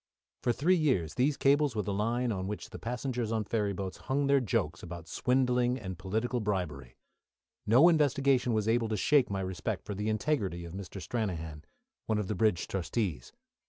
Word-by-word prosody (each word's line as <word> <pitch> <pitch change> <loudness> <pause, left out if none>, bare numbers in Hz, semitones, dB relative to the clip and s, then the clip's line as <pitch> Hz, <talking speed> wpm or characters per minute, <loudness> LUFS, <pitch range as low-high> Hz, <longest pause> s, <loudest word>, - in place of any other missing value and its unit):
For 120 - +2
three 160 +10 +3
years 130 - +1
these 135 +3 +1
cables 140 -2 +3
were 105 - 0
the 100 - -2
line 115 +4 0
on 95 -3 -3
which 105 -3 -6
the - - -8
passengers 125 -1 -3
on 110 -1 0
ferry 105 -1 -1
boats 95 -1 -5
hung 140 +2 -1
their 140 0 +4
jokes 90 - -1
about 85 -1 -8
swindling 125 -1 +1
and 95 -7 -6
political 110 +6 -1
bribery. 90 - -3 0.7
No 125 +10 +7
investigation 140 -6 +3
was 110 -1 0
able 115 0 +2
to 110 - -1
shake 140 +5 +3
my 100 -1 -2
respect 95 -1 -3
for 105 - -4
the 105 +2 -2
integrity 105 - -1
of 85 - -9
Mr. 95 0 -7
Stranahan, 80 -7 -4 0.4
one 110 - +1
of 105 -3 -2
the 105 - -1
bridge 105 -4 +1
trustees. 90 - -2
110 Hz, 185 wpm, -30 LUFS, 95-125 Hz, 0.7 s, No